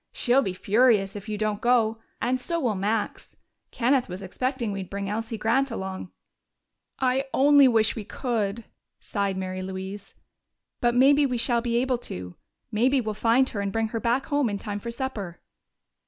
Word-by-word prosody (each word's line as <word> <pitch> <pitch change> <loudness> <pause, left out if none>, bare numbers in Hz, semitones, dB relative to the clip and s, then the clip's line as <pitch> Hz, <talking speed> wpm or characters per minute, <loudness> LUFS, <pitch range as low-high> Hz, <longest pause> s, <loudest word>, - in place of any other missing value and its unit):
She'll 250 +2 +2
be 190 -8 -3
furious 210 -1 +3
if 205 +1 -7
you 210 - -2
don't 215 0 -1
go 230 -2 +2 0.2
and 255 +2 0
so 335 +6 -2
will 245 -8 +1
Max. 210 +3 -2 0.3
Kenneth 250 0 +1
was 185 +2 -6
expecting 250 +3 -2
we'd 195 -2 -5
bring 200 0 -4
Elsie 225 +2 -3
Grant 235 +6 +1
along." 190 -4 -5 0.9
"I 260 +1 +1
only 285 0 +6
wish 225 -3 +3
we 220 - -5
could!" 225 -2 -2 0.4
sighed 200 -2 -2
Mary 185 0 -4
Louise. 190 +2 -7 0.6
"But 240 0 +2
maybe 280 +3 +5
we 250 -2 -1
shall 235 0 +1
be 235 0 0
able 250 0 +1
to. 90 - -7 0.4
Maybe 255 +5 +3
we'll 220 -3 -2
find 230 +5 +3
her 205 - -3
and 200 -1 -2
bring 225 +1 0
her 225 - -3
back 245 +4 0
home 285 -4 +1
in 200 - -2
time 205 0 -5
for 235 - -6
supper." 235 -8 -5
225 Hz, 175 wpm, -26 LUFS, 200-250 Hz, 0.9 s, only